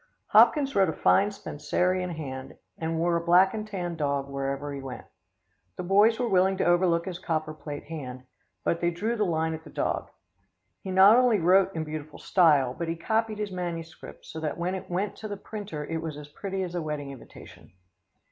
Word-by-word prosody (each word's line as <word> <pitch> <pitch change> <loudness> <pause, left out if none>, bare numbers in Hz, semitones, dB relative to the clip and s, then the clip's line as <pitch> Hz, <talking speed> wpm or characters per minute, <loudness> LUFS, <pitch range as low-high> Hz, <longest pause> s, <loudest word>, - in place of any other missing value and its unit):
Hopkins 280 -3 +5
wrote 195 -1 +4
a - - -1
fine 200 +1 +3
Spencerian 180 0 -1
hand 135 -5 -7 0.2
and 160 0 -3
wore 170 +1 +2
a - - -2
black 180 +3 +5
and 215 -1 -4
tan 180 -5 -4
dog 140 -3 -1
where 140 0 -3
ever 140 +1 -4
he 140 - -6
went. 135 -2 -8 0.7
The - - -5
boys 205 +5 +4
were 245 - +1
willing 190 -1 +3
to - - 0
overlook 175 -1 +3
his 180 -2 -5
copper 155 -1 -2
plate 150 -1 -7
hand, 130 -5 -7 0.4
but 170 - 0
they 170 - +2
drew 210 +8 -2
the 215 -2 +1
line 160 -1 0
at 160 0 -7
the 155 - -12
dog. - - -2 0.7
He 190 - -8
not 190 +4 +7
only 250 -3 +4
wrote 190 +2 +4
in 160 - -1
beautiful 155 -1 -7
style, 150 -9 +3
but 170 +4 -4
he 165 - -1
copied 220 +5 -1
his 210 -2 -3
manuscript, 170 -3 -6
so 160 - -7
that 155 -3 -3
when 175 +2 -1
it 190 - -6
went 190 +3 -1
in - - -22
to 215 - -6
the 205 -1 -5
printer 200 -7 -6
it 160 +1 -3
was 160 -3 -5
as 150 0 -10
pretty 190 +4 -4
as 175 -1 -5
a 175 - -2
wedding 150 -3 -4
invitation. 135 -4 -13
170 Hz, 210 wpm, -27 LUFS, 155-195 Hz, 0.7 s, not